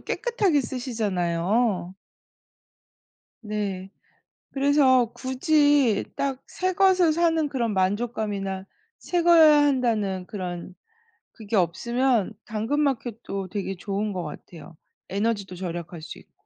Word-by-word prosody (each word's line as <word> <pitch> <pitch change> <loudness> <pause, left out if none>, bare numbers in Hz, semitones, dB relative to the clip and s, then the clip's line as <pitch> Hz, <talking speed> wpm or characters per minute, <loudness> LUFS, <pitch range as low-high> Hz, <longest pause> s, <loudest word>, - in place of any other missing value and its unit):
깨끗하게 410 -11 0
쓰시잖아요. 205 -5 -1 1.5
네. 205 -3 -4 0.6
그래서 270 -4 +3
굳이 275 -3 +2
딱 275 -2 -2
새 370 0 -2
것을 370 -3 +4
사는 325 -2 +2
그런 240 -5 -1
만족감이나 195 -1 -1 0.3
새 350 -1 -1
거여야 320 -3 +7
한다는 225 -9 0
그런 180 -3 -6 0.6
그게 220 -1 -5
없으면 230 +5 +1
당근마켓도 225 -4 -2
되게 195 0 -4
좋은 200 +3 -3
것 180 -2 -3
같아요, 165 +1 -10 0.3
에너지도 200 -2 -2
절약할 175 -2 -6
수 155 - -9
있고. - - -22
220 Hz, 235 characters per minute, -25 LUFS, 190-275 Hz, 1.5 s, 거여야